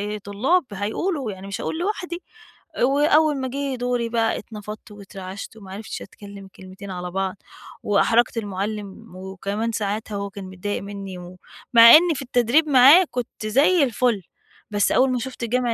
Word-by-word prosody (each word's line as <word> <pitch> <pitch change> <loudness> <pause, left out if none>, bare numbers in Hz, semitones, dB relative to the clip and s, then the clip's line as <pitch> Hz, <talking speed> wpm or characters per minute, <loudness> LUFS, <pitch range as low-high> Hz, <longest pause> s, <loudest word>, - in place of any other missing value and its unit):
أ - - -4
طلاب 260 - +1
هيقولوا، 225 - -2
يعني 190 0 -10
مش 200 - -5
هاقول - - -3
لوحدي. 355 -2 -3 0.6
وأول 295 +3 +3
ما 260 - -2
جِه 275 +1 -3
دوري 245 -1 -2
بقى 225 -1 0
اتنفضت 210 -1 -10
واترعشت 195 0 -9
و - - -14
ما 190 -1 -11
عرفتش 215 +3 -7
أتكلم 200 -1 -11
كلمتين 190 +1 -10
على 180 -1 -5
بعض، 190 +1 -2 0.5
وأحرجت 230 +3 +2
المعلِّم، 205 0 -5
وكمان 195 +4 -4
ساعاتها 210 0 -3
هو 200 0 -4
كان 195 -1 -9
متضايق 190 +2 -4
منّي، 200 -2 -7
و 180 +1 -11 0.4
مع 230 0 +10
إن 340 +1 +5
في - - -5
التدريب 255 +4 +2
معاه 280 +7 +7
كنت 240 -3 -5
زي 290 - +4
الفُل، 240 -4 +1 0.5
بس 205 -1 +1
أول 260 +1 +3
ما 250 - 0
شُفْت 255 0 -7
جمع 245 0 0
220 Hz, 165 wpm, -22 LUFS, 200-255 Hz, 0.6 s, مع